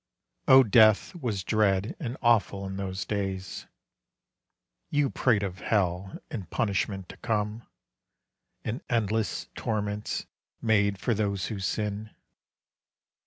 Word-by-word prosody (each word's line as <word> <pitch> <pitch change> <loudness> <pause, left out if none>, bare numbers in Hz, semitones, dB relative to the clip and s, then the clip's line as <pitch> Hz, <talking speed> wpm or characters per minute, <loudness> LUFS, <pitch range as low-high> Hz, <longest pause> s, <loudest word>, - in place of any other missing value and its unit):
O 130 0 +9
death 110 - +5
was 120 - -3
dread 105 0 +1
and 125 -4 -4
awful 105 -4 +3
in 95 0 -5
those 95 -1 -3
days! 95 -2 -3 1.2
You 145 -2 +1
prate 110 -6 +2
of 95 -1 -4
hell 95 -2 0
and 95 -7 -5
punishment 100 -2 -1
to - - -10
come, 105 +1 -2 1.0
And 115 +5 -3
endless 110 -3 0
torments 105 -1 -2 0.3
made 100 -3 +2
for 120 - 0
those 100 -3 -1
who 100 - -5
sin. 105 +2 -2
105 Hz, 115 wpm, -28 LUFS, 95-110 Hz, 1.2 s, O